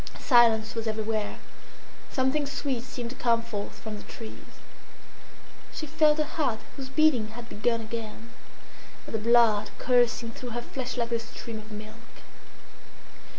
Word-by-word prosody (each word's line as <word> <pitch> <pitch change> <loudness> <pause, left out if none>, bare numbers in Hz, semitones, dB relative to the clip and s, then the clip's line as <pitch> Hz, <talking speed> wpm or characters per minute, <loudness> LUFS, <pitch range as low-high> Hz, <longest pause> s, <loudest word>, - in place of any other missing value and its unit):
Silence 230 -3 +5
was 225 -1 -3
everywhere; 215 -1 -1 0.7
something 275 +2 +1
sweet 275 -3 -2
seemed 245 -2 -5
to - - -8
come 235 -3 +2
forth 210 -3 -5
from 215 -1 -6
the - - -9
trees; 225 -1 -10 1.1
she 310 - -4
felt 305 0 +4
her 305 - +3
heart, 295 -6 0 0.2
whose 265 -2 -6
beating 265 -6 +4
had 235 +2 -9
begun 230 +1 0
again, 225 +1 -6 0.7
and - - -9
the 220 - +1
blood 220 -2 +5
coursing 240 -2 +3
through 245 +2 -7
her 240 +1 -3
flesh 255 0 -5
like 235 -1 -1
a 235 - +2
stream 230 0 -7
of 215 +1 -12
milk. 215 0 -10
235 Hz, 150 wpm, -28 LUFS, 220-260 Hz, 1.1 s, Silence